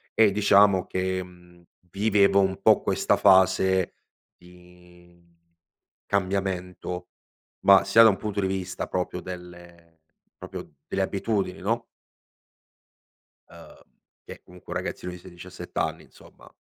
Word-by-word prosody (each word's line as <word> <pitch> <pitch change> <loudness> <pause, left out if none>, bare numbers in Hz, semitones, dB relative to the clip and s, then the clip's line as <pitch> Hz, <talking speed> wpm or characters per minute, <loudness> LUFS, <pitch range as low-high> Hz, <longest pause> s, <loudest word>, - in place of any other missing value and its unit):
e 110 -2 +5
diciamo 100 -2 +4
che, 95 0 -2
mhmm, 90 -1 -18 0.3
vivevo 100 -1 +3
un 95 -1 -1
po' - - +4
questa - - +1
fase 95 0 +3 0.4
di 90 0 -20 0.8
cambiamento 95 -2 -3 0.6
ma 100 -1 +7
sia 100 +4 +5
da 110 - +8
un 100 - 0
punto 105 -2 -3
di 95 - 0
vista 95 -1 -4
proprio 90 0 -3
delle 85 -2 -12 0.4
proprio - - -10
delle 95 - -2
abitudini 95 -1 -2
no? 115 +4 -2 1.6
Uhm, - - -16 0.4
che - - -11
comunque 90 -1 -11
un 90 - -1
ragazzino 90 0 -6
di 90 - -9
16-17 90 0 -12
anni - - -2
insomma, - - -19
95 Hz, 120 wpm, -25 LUFS, 90-100 Hz, 1.6 s, da